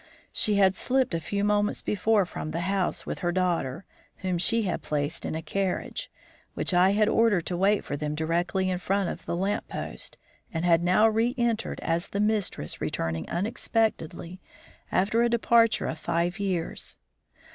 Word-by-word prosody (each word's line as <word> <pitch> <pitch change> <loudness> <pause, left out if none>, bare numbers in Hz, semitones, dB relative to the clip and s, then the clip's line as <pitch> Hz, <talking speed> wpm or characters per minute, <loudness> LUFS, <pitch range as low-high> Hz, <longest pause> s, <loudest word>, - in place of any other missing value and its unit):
She 210 - +3
had 190 -2 +5
slipped 260 +2 +1
a 165 - 0
few 200 +5 -2
moments 205 0 +1
before 210 0 +2
from 155 - -6
the 165 +2 -3
house 190 0 -1
with - - -4
her 175 - 0
daughter, 175 -4 -1 0.4
whom 185 -2 0
she 230 +5 +2
had 185 - -2
placed 150 +2 -2
in - - -3
a 160 - -4
carriage, 195 - -2 0.5
which - - -1
I 180 +2 +5
had 210 +1 +3
ordered 220 -6 +3
to 180 - -2
wait 195 +3 +2
for 145 - -3
them 150 +1 -3
directly 175 +4 0
in 180 - -1
front 195 0 0
of - - -7
the - - -1
lamppost, 195 +4 -3 0.3
and 165 +1 -2
had 170 -1 +4
now 185 +5 +5
re 225 +3 +1
entered 235 -2 -1
as 165 +1 -1
the 200 - -4
mistress 210 - 0
returning 80 -1 -2
unexpectedly 185 -3 -2 0.5
after 210 +5 +2
a 235 - +3
departure 230 -1 +3
of 160 - -3
five 170 +4 -1
years. 185 -4 -3
190 Hz, 170 wpm, -27 LUFS, 170-210 Hz, 0.5 s, had